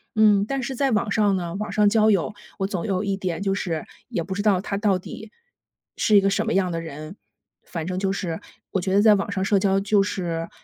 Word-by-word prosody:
嗯， 210 -2 +5
但 270 +4 -2
是 265 +1 -4
在 275 +1 +1
网 210 -1 +1
上 205 -2 +3
呢， 175 -2 -4
网 210 +2 -4
上 210 -1 +3
交 215 +1 +4
友， 200 +1 +1 0.3
我 195 - 0
总 190 -4 -3
有 195 -2 -1
一 200 -1 0
点 185 -3 -3
就 195 -1 0
是 165 -5 -3 0.2
也 220 -8 -2
不 190 +3 -5
知 200 - -2
道 205 -3 +3
他 200 +1 -4
到 200 -3 +1
底 215 +4 -10 0.6
是 210 - +4
一 - - +6
个 195 - +2
什 195 - 0
么 - - 0
样 185 -2 +1
的 165 - -2
人， 155 +2 -8 0.5
反 165 -3 -5
正 185 0 -3
就 190 0 0
是， 180 -4 -3 0.3
我 190 - 0
觉 190 +1 -1
得 200 - +5
在 215 -1 +6
网 200 0 -2
上 190 -2 -1
社 200 0 +3
交 195 0 +2
就 200 0 +2
是 170 -4 -3
195 Hz, 265 characters per minute, -23 LUFS, 185-210 Hz, 0.6 s, 一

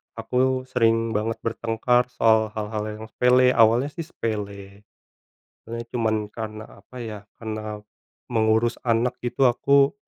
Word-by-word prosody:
aku 130 +3 0
sering 115 -2 +2
banget 110 +1 -1
bertengkar 115 +2 +1
soal 110 -3 +3
hal-hal 105 0 -3
yang 110 +1 -7
sepele. 125 +1 +4
Awalnya 115 +4 +4
sih 165 +2 -6
sepele. 100 - -5 0.8
Awalnya 115 +1 -6
cuman 110 -2 +1
karena 110 -1 -6 0.2
apa, 125 - -16
ya, 110 -4 -6 0.2
karena 110 -1 -5 0.5
mengurus 110 0 +2
anak 120 +1 +1
gitu 125 +2 +2
aku, 140 +5 +3
115 Hz, 125 wpm, -24 LUFS, 110-125 Hz, 0.8 s, sepele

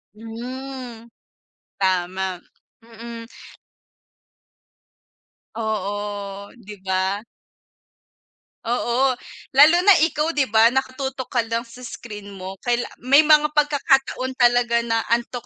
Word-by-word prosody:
Mm. 240 +1 -8 0.7
Tama. 185 -1 -1 0.4
Mm. 230 0 -10 2.3
Oo, 205 -2 -4
'di 210 -1 -10
ba? 190 +3 -1 1.4
Oo. 245 +2 +1 0.4
Lalo 300 +6 +7
na 405 - +9
ikaw 320 0 +1
'di 270 -6 0
ba, 225 +3 +5
nakatutok 265 0 -3
ka 240 - +1
lang 230 0 -2
sa 245 +1 -12
screen 210 -3 -9
mo. 190 0 -8
Kaila 240 0 0 0.2
may 280 +4 +7
mga 300 -1 +4
pagkakataon 270 -3 +1
talaga 240 -2 +3
na 225 -1 -1
antok 240 +1 -2
235 Hz, 95 wpm, -22 LUFS, 210-260 Hz, 2.3 s, na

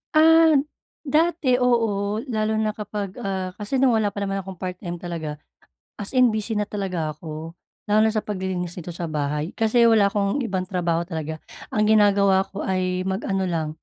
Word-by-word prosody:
Ah, 320 0 +6 0.5
dati 310 -3 +2
oo, 225 -3 +1
lalo 215 0 0
na 215 0 +1
kapag, 210 -1 -6
ah, 190 -4 -3
kasi 210 +6 -3
nung 265 -1 +4
wala 210 - +1
pa 200 - -2
naman 195 0 -2
akong 190 -1 -7
part-time 180 0 -5
talaga, 165 -4 -5 0.6
as 205 +5 -5
in 255 -2 +5
busy 215 +1 -2
na 210 - +1
talaga 185 -6 -3
ako. 160 +2 -8 0.3
Lalo 215 +1 +5
na 220 - +1
sa 215 - 0
paglilinis 185 -3 -3
dito 175 0 -6
sa 170 -1 -4
bahay 150 +2 -2
kasi 225 +2 +3
wala 220 -3 +5
akong 200 +4 0
ibang 190 -3 -1
trabaho 175 -3 -1
talaga. 160 -2 -5 0.3
Ang 210 0 +2
ginagawa 200 -2 +4
ko 200 - -6
ay 185 -1 -1
mag-ano 190 0 -1
lang, 160 -2 -1
195 Hz, 175 wpm, -23 LUFS, 180-220 Hz, 0.6 s, Ah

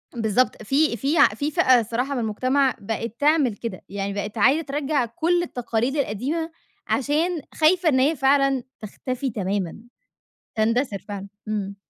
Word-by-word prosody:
بالضبط، 225 0 +1
في 270 +2 +2
في 280 +6 0 0.2
في 290 +5 -2
فئة 255 -3 +5
الصراحة 235 +5 -2
من 250 - -1
المجتمَع 255 +4 +1
بقِت 225 +2 -4
تعمل 290 -6 +3
كده، 220 -5 -6
يعني 200 0 -3
بقِت 205 +2 -4
عايزة 270 +9 +4
ترَجَّع 285 -3 -1
كلّ 345 +8 0
التقاليد 245 -3 -2
القديمة 285 +7 -2 0.4
عشان 305 +5 0
خايفة 335 +2 +3
إن 260 -3 +3
هي 290 +5 +3
فعلًا 275 -1 +2 0.2
تختفي 255 +5 -4
تمامًا. 195 -3 -3 0.8
تندثِر 225 -1 +1
فعلًا. 200 -1 -6 0.2
إمم. 200 -2 -3
255 Hz, 140 wpm, -23 LUFS, 215-290 Hz, 0.8 s, فئة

